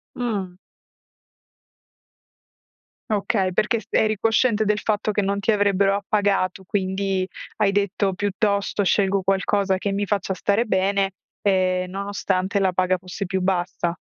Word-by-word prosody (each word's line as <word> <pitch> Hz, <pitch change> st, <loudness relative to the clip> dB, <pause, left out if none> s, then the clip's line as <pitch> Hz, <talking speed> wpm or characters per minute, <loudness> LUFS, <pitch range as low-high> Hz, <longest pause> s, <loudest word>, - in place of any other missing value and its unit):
Mh. 200 Hz, -7 st, -3 dB, 2.5 s
Okay, 200 Hz, -2 st, +1 dB
perché 215 Hz, +4 st, +1 dB
s -, -, -20 dB
eri 215 Hz, -1 st, +2 dB
cosciente 225 Hz, 0 st, +2 dB
del 210 Hz, 0 st, +1 dB
fatto 215 Hz, 0 st, 0 dB
che 205 Hz, -, 0 dB
non 200 Hz, +1 st, -1 dB
ti 225 Hz, -, +2 dB
avrebbero 200 Hz, -1 st, +2 dB
appagato, 200 Hz, -2 st, 0 dB
quindi 190 Hz, 0 st, -1 dB, 0.3 s
hai 205 Hz, -2 st, +3 dB
detto: 200 Hz, -1 st, 0 dB
"Piuttosto 200 Hz, +1 st, 0 dB
scelgo 195 Hz, 0 st, +2 dB
qualcosa 195 Hz, 0 st, +1 dB
che 200 Hz, +1 st, -2 dB
mi 200 Hz, +1 st, -1 dB
faccia 195 Hz, -1 st, -1 dB
stare 205 Hz, +4 st, +1 dB
bene", 195 Hz, 0 st, +1 dB, 0.3 s
ehm, 185 Hz, -2 st, +1 dB
nonostante 200 Hz, 0 st, -1 dB
la 190 Hz, -1 st, +2 dB
paga 185 Hz, 0 st, +1 dB
fosse 185 Hz, +2 st, -6 dB
più 190 Hz, +1 st, -2 dB
bassa. 175 Hz, -2 st, -1 dB
195 Hz, 130 wpm, -23 LUFS, 190-205 Hz, 2.5 s, hai